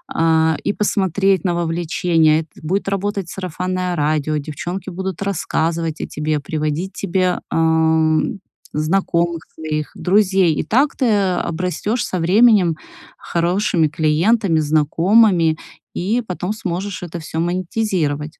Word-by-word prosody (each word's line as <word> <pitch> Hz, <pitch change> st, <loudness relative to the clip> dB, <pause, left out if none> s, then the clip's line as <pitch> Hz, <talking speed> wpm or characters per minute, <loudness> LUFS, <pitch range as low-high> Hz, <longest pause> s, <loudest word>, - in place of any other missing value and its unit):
э, 160 Hz, -1 st, +3 dB
и -, -, 0 dB
посмотреть 195 Hz, -2 st, +1 dB
на 175 Hz, -, +1 dB
вовлечение. 165 Hz, -1 st, +1 dB
Это 160 Hz, -2 st, -15 dB
будет 195 Hz, +4 st, -1 dB
работать 195 Hz, -2 st, -2 dB
сарафанное 185 Hz, -1 st, -3 dB
радио, 155 Hz, 0 st, 0 dB
девчонки 175 Hz, +6 st, -5 dB
будут 190 Hz, 0 st, -5 dB
рассказывать 165 Hz, -4 st, -1 dB
о -, -, -4 dB
тебе, 150 Hz, 0 st, -2 dB
приводить 155 Hz, +5 st, -3 dB
тебе, 185 Hz, -1 st, 0 dB
ам, 160 Hz, +2 st, +2 dB, 0.4 s
знакомых 170 Hz, +1 st, 0 dB
своих 155 Hz, -2 st, -4 dB
друзей, 190 Hz, -3 st, +2 dB
и -, -, -1 dB
так 265 Hz, -, +1 dB
ты 260 Hz, -, +1 dB, 0.3 s
обрастешь 180 Hz, +7 st, -2 dB
со 185 Hz, -, -3 dB
временем 190 Hz, -1 st, +4 dB, 0.4 s
хорошими 175 Hz, 0 st, +1 dB
клиентами, 165 Hz, +6 st, +2 dB
знакомыми, 165 Hz, +4 st, +3 dB, 0.4 s
и 220 Hz, +7 st, -1 dB
потом 180 Hz, +2 st, -3 dB
сможешь 195 Hz, -2 st, -4 dB
это 175 Hz, 0 st, -6 dB
всё 160 Hz, 0 st, -5 dB
монетизировать. 175 Hz, -4 st, -2 dB
175 Hz, 115 wpm, -19 LUFS, 160-195 Hz, 0.4 s, временем